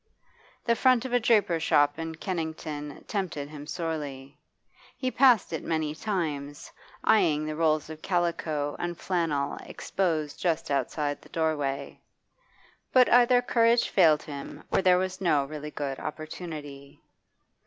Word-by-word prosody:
The 235 - +3
front 255 0 +3
of 255 - -4
a 245 - +5
draper's 210 -8 +2
shop 145 0 +3
in 165 0 -4
Kennington 160 -4 -5
tempted 175 -8 -3
him 150 -1 -9
sorely; 145 -5 -5 0.6
he 255 -1 -1
passed 250 -10 +4
it 160 - -3
many 160 -2 -1
times, 155 -7 -3 0.3
eyeing 170 -9 +3
the 155 0 -3
rolls 155 -2 +1
of 155 0 -9
calico 165 -5 -1
and 175 -1 -3
flannel 160 -6 -1
exposed 160 -6 -2
just 165 -4 -1
outside 145 +2 -1
the - - -17
doorway. 145 -4 -2 0.9
But 255 -1 +5
either 245 0 +5
courage 235 -1 +3
failed 160 -5 +4
him 140 -2 -8
or - - +3
there 185 -1 +5
was 185 +1 -2
no 150 -6 +2
really 150 +1 -7
good 140 -3 -4
opportunity. 150 -4 -7
160 Hz, 135 wpm, -27 LUFS, 145-185 Hz, 0.9 s, a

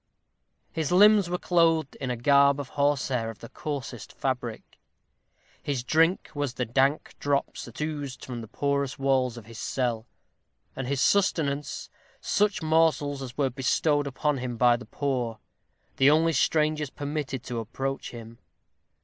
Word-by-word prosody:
His 160 -1 -2
limbs 205 0 +6
were 180 - 0
clothed 165 -5 +2
in 135 - -4
a 125 - -1
garb 140 +3 +4
of 140 -2 -5
horsehair 135 -5 0
of 115 - -8
the 115 - -11
coarsest 135 -6 -6
fabric; 125 -4 -4 0.8
his 135 -4 -2
drink 165 +7 +2
was 145 -4 -2
the 125 - -1
dank 135 +5 +1
drops 140 -1 -1
that - - -11
oozed 150 -4 -4
from 120 -2 -6
the 110 - -9
porous 140 +3 -1
walls 130 -3 +1
of 115 - -10
his 115 0 -10
cell; 120 -3 -2 0.7
and 135 - -4
his 140 0 -1
sustenance, 150 -8 +1 0.3
such 205 -5 +1
morsels 155 -3 +2
as 125 -3 -8
were 135 -3 +1
bestowed 145 +3 +1
upon 140 +1 -1
him 125 -2 -4
by 120 0 +5
the 125 +1 -9
poor 125 -6 -2 0.6
the 135 +1 +6
only 160 +2 +4
strangers 150 0 +1
permitted 145 -3 -4
to 120 -3 -4
approach 135 +5 -4
him. 115 -1 -10
140 Hz, 150 wpm, -27 LUFS, 125-150 Hz, 0.8 s, limbs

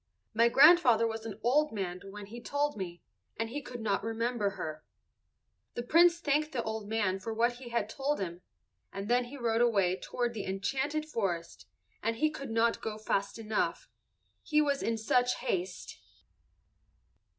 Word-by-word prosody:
My 230 +2 +5
grandfather 270 -5 +7
was 225 0 -3
an 210 -1 -7
old 295 +6 +3
man 185 -4 -4
when 205 +1 -8
he 235 +4 -9
told 290 +4 -1
me, 175 -4 -6 0.3
and 225 +1 -2
he 290 +3 -3
could 245 -4 -8
not 205 -3 0
remember 225 -1 0
her." 155 -1 -5 0.9
The 240 - -3
Prince 335 +6 +5
thanked 300 0 0
the 240 -3 -1
old 220 -2 -4
man 205 -4 0
for 220 +3 -5
what 240 +2 +2
he 250 -1 -9
had 235 -3 0
told 275 +6 -2
him, 175 -2 -4 0.5
and 195 +1 -5
then 245 +1 +3
he 270 +4 -9
rode 230 -2 +1
away 200 -7 +3
toward 240 +4 -3
the 215 - -4
enchanted 275 +11 -1
forest, 175 - -3 0.3
and 225 +1 0
he 305 +6 +1
could 275 -3 -7
not 230 +1 +2
go 215 -1 -4
fast 200 -1 -1
enough, 220 -1 -2 0.5
he 300 -1 +2
was 285 -2 +2
in 230 0 0
such 245 +3 +2
haste. 190 -7 -3
230 Hz, 170 wpm, -31 LUFS, 205-260 Hz, 0.9 s, grandfather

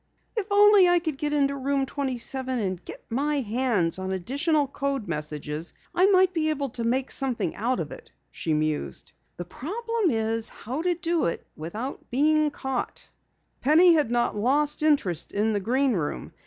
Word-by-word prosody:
"If 430 -4 -2
only 410 -2 +6
I 350 - +5
could 315 -5 -3
get 295 -1 -1
into 280 -1 +1
Room 275 0 0
27 260 -1 -2
and 185 -5 -3
get - - -10
my 285 +4 +1
hands 215 -7 +1
on 190 0 -4
additional 285 - 0
code 275 -4 -3
messages 150 0 -4 0.2
I 370 +2 +4
might 375 -2 +4
be 315 -3 +1
able 285 -3 -1
to 235 0 -4
make 255 +3 0
something 265 -3 +1
out 245 +4 -1
of - - -4
it," 470 -1 -11 0.2
she 160 - -3
mused. 150 - -2 0.3
"The 175 - -5
problem 450 - -2
is 225 -2 0
how 255 +8 -5
to 355 0 +1
do 340 -1 0
it 170 - -2
without 210 - -6
being 305 +4 +3
caught." 265 -3 -4 0.5
Penny 335 +5 +6
had 300 -7 +2
not 240 -2 0
lost 285 +8 +1
interest 280 - +1
in 215 +2 +1
the 205 - 0
Green 255 +6 +1
Room. 160 -7 -3
270 Hz, 170 wpm, -26 LUFS, 220-310 Hz, 0.5 s, only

